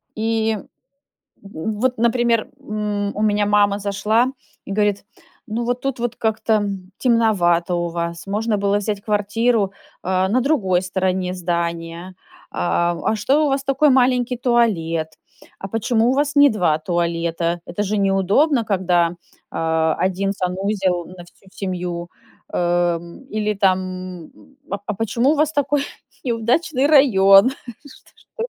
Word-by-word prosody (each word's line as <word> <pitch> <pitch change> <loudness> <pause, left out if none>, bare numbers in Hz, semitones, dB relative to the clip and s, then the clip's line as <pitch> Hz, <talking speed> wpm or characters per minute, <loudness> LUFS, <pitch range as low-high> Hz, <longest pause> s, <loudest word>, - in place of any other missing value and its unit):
и 220 0 0 0.8
в 205 +2 -5
вот, 255 -2 +1
например, 235 -1 +2
м, 210 -1 -3
у 210 - -3
меня 210 -1 +2
мама 205 -1 +3
зашла 210 +4 +1 0.4
и - - -7
говорит: 205 -1 0 0.4
"Ну, 230 +2 -3
вот 245 +1 -1
тут 270 -2 -3
вот 240 -1 -2
как-то 220 -1 0 0.3
темновато 185 -8 +2
у 175 0 -1
вас. 170 +1 -4
Можно 210 +1 0
было 200 0 +1
взять 205 -1 -3
квартиру, 210 0 0 0.3
а, 185 +1 +1
на 250 +4 +2
другой 195 - +1
стороне 185 0 -1
здания. 170 0 -3 0.4
А 175 0 0
в - - -9
А 220 - +2
что 275 +8 +2
у - - +1
вас 270 0 0
такой 275 +2 +3
маленький 250 -1 +2
туалет? 195 - +1 0.5
А 195 - -6
почему 225 +2 +1
у - - +2
вас 285 +1 0
не 285 0 +7
2 175 -8 +1
туалета? 170 0 -1
Это 190 +4 -3
же 210 +1 -1
неудобно, 200 - +2
когда, 175 -4 +1 0.4
а, 160 -1 0
1 190 +1 0
санузел 185 -1 -1
на 180 -1 -11
всю 190 - -23
семью". 180 -3 -4 0.4
Э, - - -1 0.4
м, 170 +10 -12
или 215 0 0
там, 190 -1 +3 0.5
м: 275 - -21
"А 200 - -1
а 210 - -1
почему 230 +6 +1
у - - +2
вас 305 +1 +1
такой 285 -1 0 0.4
неудачный 255 +4 +1
район?" 205 -7 +6
Что - - -13 0.8
что? 485 - -4
205 Hz, 145 wpm, -20 LUFS, 180-235 Hz, 0.8 s, не